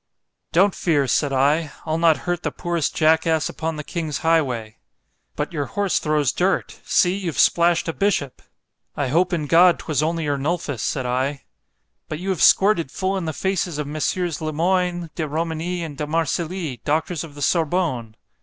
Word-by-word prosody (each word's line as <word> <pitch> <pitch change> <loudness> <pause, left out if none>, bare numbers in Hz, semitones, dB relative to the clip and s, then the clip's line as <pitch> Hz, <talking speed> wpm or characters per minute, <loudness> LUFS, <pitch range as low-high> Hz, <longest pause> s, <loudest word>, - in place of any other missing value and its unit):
—Don't 190 +4 +4
fear, 150 -5 +1
said 140 +2 +1
I—I'll 150 +3 0
not 165 -2 +3
hurt 175 -2 -1
the - - -1
poorest 170 -3 -2
jack 160 +1 +3
ass 160 -1 +1
upon 160 0 -3
the 150 - -5
king's 155 -3 -3
highway.—But 145 0 -3
your 145 -3 -1
horse 200 -2 0
throws 150 -3 +1
dirt; 185 +2 -1
see 180 +1 +2
you've 180 -6 -4
splash'd 170 0 +3
a 165 - -1
bishop——I 145 -6 -4
hope 175 +6 +2
in 165 -4 -1
God, 170 +4 +5
'twas 155 -3 -1
only 165 +1 -1
Ernulphus, 145 -1 -2
said 130 -4 -2
I.——But 135 +4 -5
you 185 +4 -5
have 185 -4 -1
squirted 190 -7 +4
full 190 +7 -2
in 190 -3 -2
the 160 - -1
faces 180 -1 -2
of 150 - -2
Mess. 150 +1 -1
Le 160 -3 -2
Moyne, 175 +1 0
De 155 - -3
Romigny, 165 +3 -2
and 150 -4 -7
De 150 - -2
Marcilly, 165 - -2
doctors 160 +2 -1
of 155 -3 -11
the 145 - -9
_Sorbonne. 155 -8 0
160 Hz, 165 wpm, -22 LUFS, 145-175 Hz, -, God